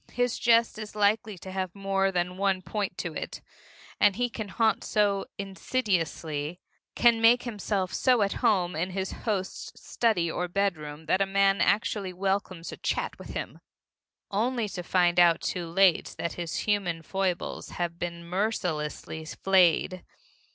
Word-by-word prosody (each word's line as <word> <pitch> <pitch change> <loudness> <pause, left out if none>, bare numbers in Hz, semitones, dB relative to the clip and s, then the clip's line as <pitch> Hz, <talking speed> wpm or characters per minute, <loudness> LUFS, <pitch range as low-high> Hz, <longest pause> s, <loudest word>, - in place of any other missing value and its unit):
His 245 -1 0
jest 230 -2 +3
is 210 -1 -7
likely 210 0 +1
to 190 +2 -9
have 185 -1 -3
more 195 -1 +1
than 180 0 -1
one 190 -1 0
point 210 0 -3
to - - -4
it, - - -5 0.6
and 205 -2 +5
he 245 0 -1
can 220 -3 -5
haunt 220 +2 +1
so 200 -2 +1
insidiously, 180 - -2 0.4
can 235 -1 +4
make 235 +2 +6
himself 205 -5 -2
so 250 -4 +3
at 200 - 0
home 190 -8 +2
in 170 +4 -1
his 190 0 -3
host's 200 -4 -4
study 220 -8 +1
or 180 +2 -2
bedroom 160 -5 -2
that 185 +4 +2
a 195 - +2
man 195 0 +3
actually 200 -2 +1
welcomes 190 -2 -2
a - - -8
chat - - -2
with - - -9
him - - -5 0.7
only 230 +2 0
to 185 -2 -5
find 175 0 +2
out 170 -2 +6
too 175 -2 -3
late 185 0 +3
that 170 - -3
his 170 -2 -4
human 195 -6 0
foibles 190 0 -2
have 170 -1 -2
been 170 -1 -5
mercilessly 170 -5 -2
flayed. 185 +1 +2
195 Hz, 155 wpm, -28 LUFS, 175-210 Hz, 0.7 s, make